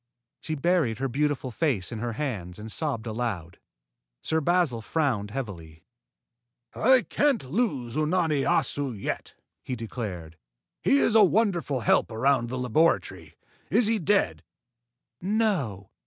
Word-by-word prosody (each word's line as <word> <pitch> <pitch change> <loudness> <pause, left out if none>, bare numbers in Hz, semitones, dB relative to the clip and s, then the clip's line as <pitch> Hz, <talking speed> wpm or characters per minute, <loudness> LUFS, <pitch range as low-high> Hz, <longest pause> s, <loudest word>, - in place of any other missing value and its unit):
She 155 - -4
buried 155 -7 +1
her 135 +2 -1
beautiful 140 0 -1
face 120 - -1
in 115 - -5
her 120 +1 -3
hands 105 -10 -4
and 110 +1 -7
sobbed 135 -7 -2
aloud. 110 -7 -4 0.6
Sir 160 0 0
Basil 165 -7 +1
frowned 120 -6 -1
heavily. 90 -10 -7 0.9
"I 255 +1 +4
can't 265 - +1
lose 145 - -1
Unani 155 -1 +1
Assu 135 -6 0
yet," - - -4 0.3
he 130 - -4
declared. 100 -8 -6 0.4
"He 275 - +4
is 230 - +3
a 220 -1 +7
wonderful 180 - +1
help - - +3
around 120 +1 +1
the 130 - -3
laboratory. 125 - +1 0.3
Is 225 +5 +3
he 220 +1 +2
dead?" 150 - +1 0.8
"No. 180 - -1
135 Hz, 130 wpm, -26 LUFS, 110-170 Hz, 0.9 s, a